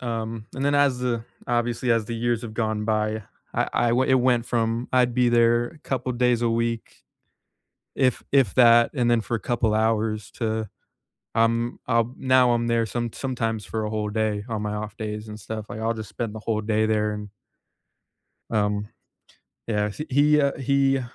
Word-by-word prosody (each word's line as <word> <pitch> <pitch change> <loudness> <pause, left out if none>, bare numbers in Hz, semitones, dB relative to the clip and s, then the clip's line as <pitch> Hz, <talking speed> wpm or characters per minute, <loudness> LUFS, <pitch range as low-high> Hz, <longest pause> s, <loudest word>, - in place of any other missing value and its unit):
Um, 115 -2 -4
and 135 +1 -3
then 145 0 +2
as 140 -3 +3
the 120 -2 -1 0.2
obviously, 120 0 0
as 115 -1 +1
the 115 - -4
years 120 0 0
have 110 -2 -7
gone 110 -2 -1
by, 110 0 0 0.3
I - - +1
I 120 - +2
w 120 +2 +3
it - - +6
went 125 -2 +2
from 115 0 -1
I'd 125 -1 +3
be 125 0 +3
there 120 0 +3
a 155 - -15
couple 130 -1 -3
days 120 -1 +2
a 120 - +2
week 115 0 -2 0.9
if 130 -3 +1
if 135 -8 +3
that, 120 -2 +6
and 125 -4 +1
then 120 -1 +3
for 110 +3 -2
a - - -2
couple 115 +1 0
hours 110 -1 0
to, 110 -2 -2 0.7
um, 115 +1 +1
um, 115 0 +1
now 130 -2 +4
I'm 120 0 0
there 115 -1 +2
some 120 0 -3
sometimes 115 -5 -2
for 110 +3 -3
a 105 - -3
whole 105 -1 -2
day 105 -1 -1
on 110 -2 -3
my 105 0 -2
off 105 +1 -5
days 105 0 -5
and 105 0 -8
stuff, 110 +1 -6
like, 110 - -6
I'll 115 +1 0
just 110 -2 -7
spend 115 -3 -4
the 110 - -6
whole 110 0 -1
day 110 0 +1
there 105 -1 +1
an 105 -1 -6 1.2
Um, 105 -1 0 0.8
yeah. 105 -2 0
He 150 +9 -6
he, 150 +3 +4
uh, 140 -1 +1
he 135 0 +2
115 Hz, 195 wpm, -24 LUFS, 110-120 Hz, 1.2 s, it